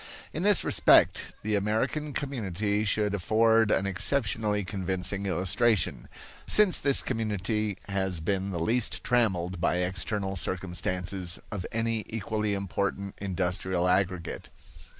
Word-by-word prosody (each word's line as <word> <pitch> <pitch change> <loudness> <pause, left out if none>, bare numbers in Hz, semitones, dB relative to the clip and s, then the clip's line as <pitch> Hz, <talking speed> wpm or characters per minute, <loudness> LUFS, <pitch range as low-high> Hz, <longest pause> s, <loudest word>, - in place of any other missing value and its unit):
In 160 - -3
this 205 +1 +4
respect - - +5 0.2
the 105 +1 -1
American 110 +9 0
community 105 -7 -2
should 105 0 +1
afford 110 +3 +3
an 95 - +2
exceptionally 105 0 +1
convincing 95 +1 -2
illustration, 95 +4 0 0.4
since 210 -4 +4
this 140 -1 +3
community 105 -3 -2
has 95 -3 -1
been 95 +4 -1
the 90 -3 -3
least 115 +8 0
trammelled 95 -8 0
by 90 - +2
external 95 +2 -2
circumstances 90 0 -2
of 100 -4 -4
any 115 -1 -1
equally 105 -1 -2
important 100 0 -3
industrial 95 -1 -1
aggregate. 90 -2 -1
100 Hz, 115 wpm, -28 LUFS, 95-110 Hz, 0.4 s, respect